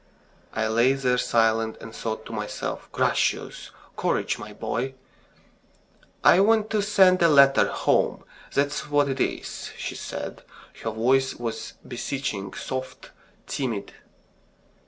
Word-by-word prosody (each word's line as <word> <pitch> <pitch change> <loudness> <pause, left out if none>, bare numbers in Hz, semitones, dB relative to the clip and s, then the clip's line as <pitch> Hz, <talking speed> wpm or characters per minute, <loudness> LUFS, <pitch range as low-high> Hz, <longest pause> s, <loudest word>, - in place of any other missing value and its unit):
I 110 0 +1
lay 120 +4 +4
there 125 -2 +1
silent, 115 -1 +2
and 115 - -10
thought 110 -1 -4
to 115 - -8
myself: 105 -1 -4
"Gracious!... - - 0 0.3
Courage, - - 0
my - - -8
boy!" 130 +3 -3 1.3
"I 175 - +7
want 215 +1 +3
to 215 -2 +2
send 190 -3 +4
a 170 - +7
letter 140 -2 +6
home, - - +1 0.3
that's 145 +1 -1
what 145 -1 +3
it 135 -1 -2
is," - - -3
she - - -4
said; - - -6 0.4
her 115 - -2
voice 130 +4 +2
was 115 -2 -5
beseeching, 125 -5 -4
soft, 130 0 -6 0.3
timid. 115 -7 -3
130 Hz, 125 wpm, -25 LUFS, 115-145 Hz, 1.3 s, I